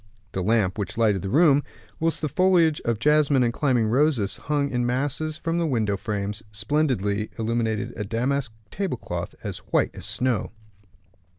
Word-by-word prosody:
The 95 - -2
lamp 105 0 +1
which 105 - -4
lighted 105 -5 +2
the 95 - -4
room, 145 - +5 0.4
whilst 165 0 0
the - - +2
foliage 170 -1 +3
of 115 -2 +1
jasmine 145 +1 +3
and 120 -1 +1
climbing 125 -6 +2
roses 120 -3 +2
hung 145 -1 -1
in 125 -1 0
masses 145 +5 -1
from 165 +2 -1
the 170 - +1
window 110 -7 0
frames, 105 0 -3
splendidly 105 -3 0
illuminated 115 -1 -1
a 105 - -3
damask 125 +4 -1 0.2
table 190 -10 -2
cloth - - -5
as - - -4
white - - 0
as - - -4
snow. 125 -3 0
125 Hz, 165 wpm, -24 LUFS, 110-150 Hz, 0.4 s, room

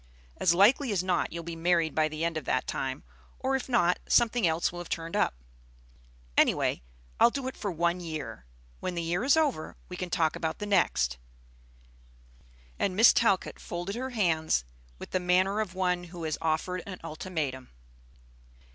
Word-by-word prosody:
As 170 -1 +3
likely 230 +7 +5
as 185 -3 0
not 185 -1 0
you'll 170 0 -5
be 170 0 -6
married 165 -1 +2
by 155 0 +2
the 155 +1 -3
end 170 -1 -1
of 155 -4 -4
that 130 0 0
time, 130 - -3 0.3
or 265 +1 0
if 265 - -3
not, 180 -8 +3
something 235 -4 +3
else 160 +1 +1
will 175 - -7
have 175 - -8
turned 165 0 -3
up! - - +2 1.0
Any - - +5
way, - - -1 0.4
I'll - - +7
do 265 +1 -4
it 260 - -5
for 205 - -3
one 170 +1 0
year. 155 - -6 0.4
When 180 - -3
the 170 - -2
year 175 +5 -1
is 280 +4 +4
over, 290 - 0
we 180 - -6
can 180 0 -4
talk 160 -2 +1
about 160 -1 -3
the 210 - -4
next." 65 - +1 1.6
And 190 -2 0
Miss 225 +4 +7
Talcott 200 -5 +1
folded 175 +3 -5
her 260 +2 -3
hands 160 - +1 0.3
with - - -10
the 185 - +1
manner 185 +3 +2
of 195 -4 -3
one 180 -1 0
who 170 -1 -9
has 155 -1 -1
offered 165 +3 -1
an 185 -2 -6
ultimatum. 155 -6 -4
175 Hz, 180 wpm, -29 LUFS, 160-200 Hz, 1.6 s, I'll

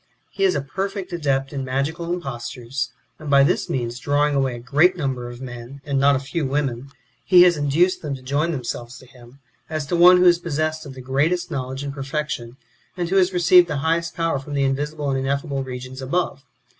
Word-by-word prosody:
He 195 0 0
is 190 - +3
a 145 - 0
perfect 195 +6 -4
adept 135 -4 -1
in 135 -1 -3
magical 145 +6 -2
impostures, 125 -5 -4 0.3
and 155 -2 -7
by 140 -1 +6
this 170 +6 +1
means 120 -1 -2
drawing 145 +1 +1
away 135 -3 0
a - - -7
great 150 +10 +3
number 130 -5 -3
of 120 +1 -10
men, 120 +1 -8
and 140 -1 0
not 140 +1 +5
a - - 0
few 145 +5 -3
women, 135 -2 -2 0.3
he 180 -2 +7
has 180 -1 +5
induced 150 +5 +1
them 145 -3 -3
to 130 - -12
join 145 +6 0
themselves 120 -3 -5
to - - -15
him, 125 0 -17 0.3
as 155 -2 -3
to 160 - -1
one 180 +1 +8
who 180 - +4
is 175 -1 +6
possessed 155 -1 -2
of 135 - -9
the 130 - -9
greatest 145 +8 0
knowledge 130 +1 -4
and 140 -1 -4
perfection, 135 -4 -4 0.4
and 175 -2 -2
who 195 - +2
has 185 0 +4
received 180 0 +5
the 150 -4 -2
highest 165 +1 0
power 165 -4 0
from 145 +2 -7
the 140 - +1
invisible 145 +2 -1
and 135 - 0
ineffable 140 +1 -2
regions 130 0 -7
above. 140 0 -2
140 Hz, 210 wpm, -22 LUFS, 130-165 Hz, 0.4 s, one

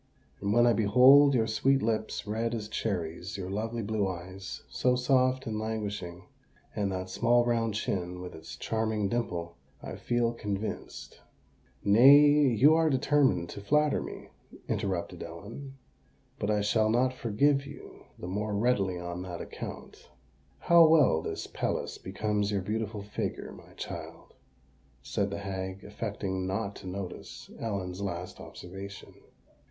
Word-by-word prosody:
"And 100 +1 -1
when 120 +2 +5
I 120 - +5
behold 130 +7 +6
your 115 -2 +3
sweet 135 +5 +2
lips, 110 -1 -1
red 115 +3 -1
as 105 -2 -4
cherries—your 95 -2 -3
lovely 115 +3 -3
blue 105 -1 0
eyes, 95 +1 -7
so 125 0 +1
soft 130 +1 +2
and 110 -3 -3
languishing—and 100 -2 -5
that 95 0 -3
small 120 +3 +3
round 115 -3 0
chin, 90 -4 -2
with 90 0 -7
its 80 - -9
charming 110 -2 -1
dimple, 85 -8 -3 0.2
I - - -7
feel 120 -1 0
convinced——" 105 -2 -5 0.6
"Nay—you 140 +4 +7
are 160 0 +3
determined 130 - +2
to 100 - -7
flatter 150 +7 +2
me," - - -8 0.4
interrupted 95 -4 -2
Ellen; 115 +11 -9 0.6
"but 105 - -1
I 105 -1 +2
shall 110 +1 +2
not 125 +3 +2
forgive 135 +4 +1
you 145 - -12
the 90 - -7
more 105 +3 -2
readily 100 -5 +1
on 85 0 -5
that 90 -2 -6
account." - - -8 0.5
"How 170 - +6
well 155 - +5
this - - -4
pelisse - - -3
becomes 105 +1 -1
your 100 -2 -1
beautiful 105 0 -3
figure, 105 - -4
my - - -14
child," - - -8 0.7
said 100 +6 -1
the 100 - -4
hag, 95 -1 -5
affecting 100 -3 -4
not 100 +1 -2
to - - -10
notice 95 0 -7
Ellen's 95 -4 -3
last 90 -2 -5
observation. 95 +2 -9
105 Hz, 135 wpm, -29 LUFS, 95-120 Hz, 0.7 s, Nay—you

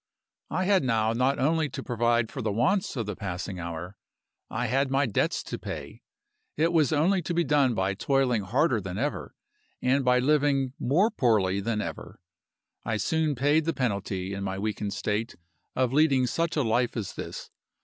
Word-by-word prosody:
"I 185 +3 -1
had 190 -3 +3
now 110 -3 +1
not 130 +4 +1
only 155 +2 +1
to 130 - -6
provide 120 -1 +1
for 130 - -5
the 110 -2 -1
wants 135 - +1
of 115 -4 -2
the 105 -1 -4
passing 95 -1 -5
hour 85 +2 -6 0.5
I 125 +3 -2
had 135 +3 +1
my 135 +1 +2
debts 115 - 0
to - - -6
pay. - - -7 0.6
It 165 +3 +2
was 155 -5 +3
only 175 +5 +2
to 170 +1 -3
be 170 - +3
done 140 -6 +2
by 95 0 0
toiling 125 +1 +1
harder 120 - +1
than 95 0 -5
ever, 145 +6 -3 0.4
and 135 +2 +2
by 125 0 +4
living 135 -1 +2
more 180 - +2
poorly 105 - +2
than 105 +1 -1
ever. - - -7 0.6
I 110 - -1
soon 155 +6 0
paid 145 +5 +2
the 165 - 0
penalty, 100 -5 -2
in 100 0 -4
my 95 -1 -3
weakened 105 0 -3
state, 105 +3 -2 0.4
of 130 -1 +1
leading 140 -3 +4
such 165 +7 -1
a 150 - +2
life 120 +2 +1
as 105 -4 -4
this. - - -7
125 Hz, 180 wpm, -27 LUFS, 105-145 Hz, 0.6 s, by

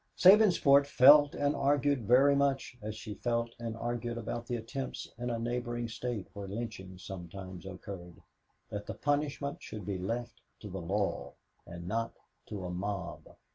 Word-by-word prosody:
Sabinsport 180 -8 +7
felt 145 +2 +7
and 145 0 +1
argued 140 -4 +2
very 135 +4 +6
much 135 -3 +1
as 110 +1 -5
she 110 -1 -6
felt 115 +2 -1
and 115 -1 -4
argued 120 0 -3
about 120 +1 -4
the 120 - -1
attempts 120 +4 -5
in 120 0 -2
a 120 - -1
neighboring 120 0 -2
State 115 -2 -4
where 100 -1 -6
lynchings 95 -4 -6
sometimes 95 0 -8
occurred 90 -2 -8 0.5
that 105 -1 -5
the - - -4
punishment 145 0 -1
should 105 -4 -7
be 95 -1 -2
left 115 +5 -4 0.2
to 105 - -8
the 95 0 -5
law 100 +4 -1 0.3
and 85 0 -8
not 115 +4 -1 0.3
to 100 -3 -5
a 90 - -4
mob. 95 0 -5
115 Hz, 160 wpm, -32 LUFS, 100-130 Hz, 0.5 s, Sabinsport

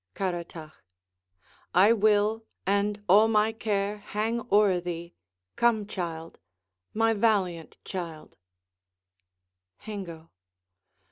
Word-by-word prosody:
Caratach 170 -4 -4 1.0
I 200 +5 +6
will, 215 +1 +2 0.2
and 205 +1 0
all 205 +4 +6
my 215 0 +3
care 210 -2 -2
hang 220 +3 -2
o'er 200 -3 +4
thee! 170 -1 -6 0.4
Come, 230 -3 +2
child, 165 -4 -6 0.6
My 225 +1 +3
valiant 195 -7 0
child! 170 -5 -7
205 Hz, 80 wpm, -27 LUFS, 175-215 Hz, 1.0 s, I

